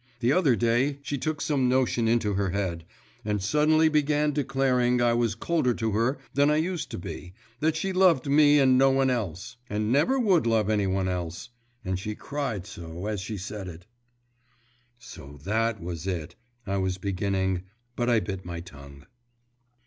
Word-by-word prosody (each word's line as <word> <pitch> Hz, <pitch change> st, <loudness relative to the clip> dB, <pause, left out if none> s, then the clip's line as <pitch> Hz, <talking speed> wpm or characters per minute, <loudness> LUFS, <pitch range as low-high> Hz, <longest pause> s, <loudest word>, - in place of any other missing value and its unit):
The 125 Hz, +2 st, +2 dB
other 150 Hz, -9 st, +3 dB
day 120 Hz, +5 st, +1 dB
she 145 Hz, -1 st, -3 dB
took 155 Hz, +2 st, -2 dB
some 135 Hz, -4 st, +1 dB
notion 125 Hz, -2 st, +1 dB
into 115 Hz, -3 st, +1 dB
her 100 Hz, 0 st, 0 dB
head, 90 Hz, -4 st, -3 dB, 0.4 s
and 105 Hz, -1 st, -1 dB
suddenly 150 Hz, +10 st, +3 dB
began 150 Hz, -1 st, +2 dB
declaring 130 Hz, -3 st, +1 dB
I 120 Hz, -1 st, +3 dB
was 115 Hz, -2 st, +1 dB
colder 125 Hz, -1 st, 0 dB
to 110 Hz, -1 st, -1 dB
her 115 Hz, +6 st, +1 dB, 0.2 s
than 140 Hz, +1 st, +3 dB
I 150 Hz, -, +3 dB
used 170 Hz, +2 st, -2 dB
to -, -, -6 dB
be, 90 Hz, +1 st, -8 dB, 0.2 s
that 155 Hz, +2 st, +1 dB
she 190 Hz, +4 st, -2 dB
loved 180 Hz, -8 st, +4 dB
me 145 Hz, +1 st, +5 dB
and 130 Hz, -2 st, +5 dB
no 135 Hz, 0 st, +5 dB
one 135 Hz, -1 st, +2 dB
else, 110 Hz, 0 st, -4 dB
and 105 Hz, +1 st, -1 dB
never 150 Hz, -, +3 dB
would 195 Hz, -, +3 dB
love 110 Hz, -2 st, +2 dB
any 105 Hz, -2 st, +1 dB
one 95 Hz, 0 st, 0 dB
else.… 90 Hz, +3 st, -4 dB, 0.4 s
And 95 Hz, 0 st, -2 dB
she 105 Hz, +2 st, -5 dB
cried 135 Hz, -10 st, -4 dB
so, 85 Hz, -1 st, -8 dB
as 105 Hz, -3 st, -2 dB
she 105 Hz, +2 st, -5 dB
said 100 Hz, +1 st, -6 dB
it 85 Hz, 0 st, -10 dB, 0.6 s
' 120 Hz, 0 st, -38 dB
'So 75 Hz, -, -12 dB
that 110 Hz, +2 st, 0 dB
was 85 Hz, 0 st, -6 dB
it,' 85 Hz, -3 st, -3 dB, 0.3 s
I 100 Hz, 0 st, -1 dB
was 95 Hz, -1 st, -1 dB
beginning, 95 Hz, -1 st, -1 dB, 0.3 s
but 120 Hz, 0 st, 0 dB
I 115 Hz, -2 st, +3 dB
bit 95 Hz, -3 st, -5 dB
my 85 Hz, -1 st, -6 dB
tongue. 70 Hz, -4 st, -13 dB
115 Hz, 180 wpm, -26 LUFS, 95-135 Hz, 0.6 s, me